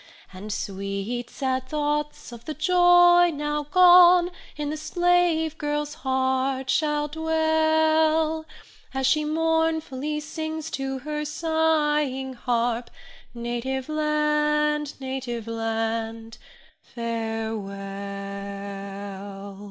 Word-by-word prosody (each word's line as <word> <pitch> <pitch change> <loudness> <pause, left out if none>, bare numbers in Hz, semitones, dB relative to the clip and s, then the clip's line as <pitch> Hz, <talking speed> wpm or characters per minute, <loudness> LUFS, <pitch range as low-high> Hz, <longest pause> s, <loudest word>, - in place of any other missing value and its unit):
And 200 +3 -7
sweet, 200 +5 -4
sad 260 -1 -2
thoughts 295 -2 -2
of 235 -1 -11
the 310 - -5
joy 350 +1 +6
now 295 0 -2
gone, 360 0 +7 0.3
In 295 -1 -2
the - - -2
slave 335 -1 +1
girl's 295 0 -2
heart 265 -2 0
shall 300 -1 +1
dwell, 315 0 +2 0.5
As 265 0 0
she 305 +3 +3
mournfully 320 -2 0
sings 315 +1 -5
to 270 0 -3
her 300 0 -2
sighing 300 -4 0
harp, 240 -1 -1 0.5
Native 240 +3 -3
land, 300 -1 +1
native 260 -4 -4
land, 225 0 -3 0.4
farewell! 225 -3 -4
295 Hz, 90 wpm, -25 LUFS, 255-315 Hz, 0.5 s, gone